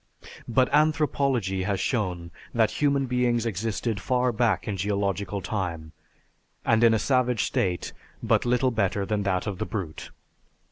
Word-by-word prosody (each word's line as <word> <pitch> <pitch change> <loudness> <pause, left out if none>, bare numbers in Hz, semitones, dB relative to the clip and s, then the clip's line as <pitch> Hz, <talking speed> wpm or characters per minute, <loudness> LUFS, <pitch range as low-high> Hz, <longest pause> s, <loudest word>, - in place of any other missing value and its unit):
But 125 +2 +3
anthropology 140 - +2
has 95 0 -1
shown 90 -8 -2 0.2
that 110 -2 +3
human 140 -2 +2
beings 125 -2 +1
existed 110 +1 -2
far 125 +5 +1
back 115 -5 0
in 105 - -1
geological 100 0 -1
time, 85 -6 -4 0.7
and 110 +1 +3
in 115 -1 +6
a - - +3
savage 125 -1 +1
state 90 -2 -1 0.3
but - - +2
little 125 +1 +2
better 100 -3 0
than 105 0 -1
that 95 -2 0
of 100 -4 -4
the - - -1
brute.... 85 -8 -5
110 Hz, 145 wpm, -26 LUFS, 95-125 Hz, 0.7 s, in